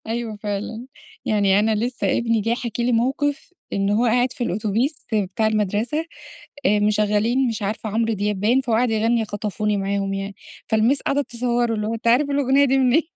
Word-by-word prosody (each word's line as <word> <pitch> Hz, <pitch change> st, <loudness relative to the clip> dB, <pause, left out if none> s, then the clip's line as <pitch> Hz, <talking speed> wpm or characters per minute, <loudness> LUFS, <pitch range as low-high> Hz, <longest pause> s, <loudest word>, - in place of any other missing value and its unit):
أيوه 225 Hz, -1 st, -3 dB
فعلًا. 215 Hz, +3 st, -4 dB, 0.4 s
يعني 200 Hz, -2 st, +3 dB
أنا 215 Hz, +1 st, +2 dB
لسّه 240 Hz, +3 st, -2 dB
ابني 230 Hz, -1 st, +1 dB
جاي 230 Hz, +3 st, 0 dB
حاكي 240 Hz, -1 st, -4 dB
لي 245 Hz, -, +1 dB
موقف، 280 Hz, +7 st, -1 dB, 0.2 s
إن 195 Hz, 0 st, 0 dB
هو 215 Hz, +4 st, +2 dB
قاعد 245 Hz, +2 st, +2 dB
في 250 Hz, -, -3 dB
الأوتوبيس 220 Hz, -, -1 dB
بتاع 210 Hz, +1 st, 0 dB
المدرسة، 215 Hz, -, 0 dB, 0.6 s
آآ 210 Hz, +2 st, +4 dB
مشغّلين 210 Hz, +4 st, +2 dB
مش 225 Hz, -2 st, -3 dB
عارفة 215 Hz, +2 st, -3 dB
عمرو 225 Hz, +2 st, 0 dB
دياب 205 Hz, -1 st, -2 dB
باين، 235 Hz, +7 st, +3 dB
فهو 240 Hz, -4 st, 0 dB
قاعد 245 Hz, +2 st, +2 dB
يغنّي 225 Hz, +1 st, +1 dB
خطفوني 210 Hz, 0 st, -2 dB
معاهم 195 Hz, 0 st, -1 dB
يعني. 195 Hz, 0 st, -4 dB, 0.3 s
فالمس 225 Hz, +6 st, +2 dB
قعدت 280 Hz, 0 st, -1 dB
تصوّره، 240 Hz, -1 st, 0 dB
اللي 210 Hz, 0 st, -2 dB
هو 225 Hz, -, -2 dB
أنت 230 Hz, +1 st, -4 dB
عارف 260 Hz, +5 st, +4 dB
الأغنية 280 Hz, 0 st, +3 dB
دي 270 Hz, 0 st, +2 dB
منين؟ 260 Hz, +4 st, +4 dB
225 Hz, 180 wpm, -22 LUFS, 210-245 Hz, 0.6 s, آآ